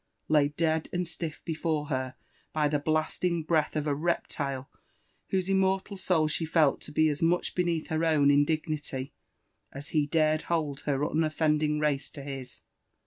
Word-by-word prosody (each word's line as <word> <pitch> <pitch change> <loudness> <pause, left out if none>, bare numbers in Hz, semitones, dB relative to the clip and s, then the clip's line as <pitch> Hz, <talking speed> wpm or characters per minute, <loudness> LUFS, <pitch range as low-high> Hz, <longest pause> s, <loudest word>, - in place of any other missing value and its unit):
laid 150 -1 +2
dead 160 -1 +1
and 180 0 -1
aiiff 165 -2 -5
before 160 -2 -1
her 130 -2 -2 0.4
by 150 -1 +2
the 145 0 +1
Uaatiog 155 +2 0
breafth 160 -2 +1
of 150 -1 -1
a 145 - +1
reptile 140 -4 -2 0.6
whose 190 -1 0
inmertal 190 +1 +1
soul 180 -4 +1
shefeltto 155 -2 +1
be 155 +1 +3
as 150 -1 -1
mudi 170 +2 +1
beneath 170 -3 -1
her 160 +1 0
own 150 -3 +4
in 145 0 +5
dignity, 150 -4 -3 0.6
as 140 +1 -7
he 150 -2 +1
darod 155 0 +2
hold 155 -5 0
her 140 -2 +2
BneffBodiag 150 0 +1
raoe 150 -2 0
to 140 - -8
his. 135 -2 -7
155 Hz, 155 wpm, -29 LUFS, 145-165 Hz, 0.6 s, in